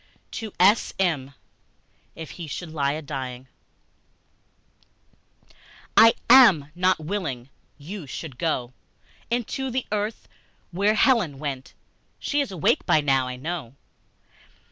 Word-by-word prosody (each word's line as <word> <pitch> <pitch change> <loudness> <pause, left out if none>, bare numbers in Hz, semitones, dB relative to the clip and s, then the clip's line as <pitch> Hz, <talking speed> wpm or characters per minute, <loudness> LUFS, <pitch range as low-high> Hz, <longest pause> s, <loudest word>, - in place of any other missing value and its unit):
To 220 -3 -6
S.M. 180 - +2 0.8
IF 160 -2 -8
HE 170 -3 -8
SHOULD 160 +2 -6
LIE 140 -3 0
A 155 - -5
DYING 130 -3 -6 2.5
I 225 +1 +7
AM 180 - +7
not 185 +2 +2
willing 155 -8 -4 0.3
you 160 +2 -8
should 135 -1 -8
go 130 -7 -1 0.6
Into 245 +3 -2
the 255 +1 -2
earth, 210 +1 -3 0.4
where 200 +5 +2
Helen 215 - +3
went; 135 -2 -6 0.4
She 290 0 -1
is 275 - -4
awake 180 -5 +1
by 155 - +4
now, 135 -3 +1
I 125 - -5
know. 140 -2 -6
160 Hz, 115 wpm, -24 LUFS, 140-205 Hz, 2.5 s, I